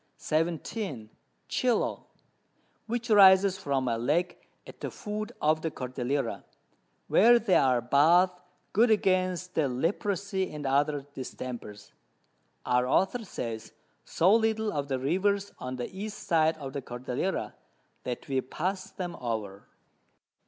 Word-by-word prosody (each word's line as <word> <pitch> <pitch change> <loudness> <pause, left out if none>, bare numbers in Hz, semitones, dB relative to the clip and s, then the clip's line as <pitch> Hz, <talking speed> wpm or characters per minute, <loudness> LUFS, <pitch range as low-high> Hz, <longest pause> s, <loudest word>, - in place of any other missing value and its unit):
17. 160 - -2 0.4
Chilo, 245 -3 0 0.8
which 240 0 -3
rises 190 -1 +7
from 140 -7 -1
a 115 -1 0
Lake 170 +9 -1 0.2
at - - -13
the - - -4
Foot 215 +1 -5
of 155 +1 +2
the 160 - -1
Cordillera, 125 - -3 0.6
where 240 +4 +6
there 215 -5 +3
are 125 -3 +3
Baths 170 +9 +4 0.3
good 230 +4 +4
against 185 -3 +1
the 155 -3 +1
Leprosy 190 - -1
and 150 -1 -6
other 140 +1 +1
Distempers. 120 -6 -7 0.7
Our 125 0 +2
Author 195 - +1
says 115 - -6 0.3
so 185 +5 +3
little 220 -1 +1
of 145 -2 -2
the 135 -1 -1
Rivers 195 +9 0
on 130 0 -5
the 125 +9 -6
East 210 +2 -5
side 160 -1 +2
of 135 -3 -7
the 140 - -3
Cordillera, 125 +8 -3 0.5
that 125 -1 -5
we 135 -1 0
pass 185 +8 -3
them 180 -3 -6
over. 110 -5 -5
160 Hz, 130 wpm, -28 LUFS, 130-195 Hz, 0.8 s, rises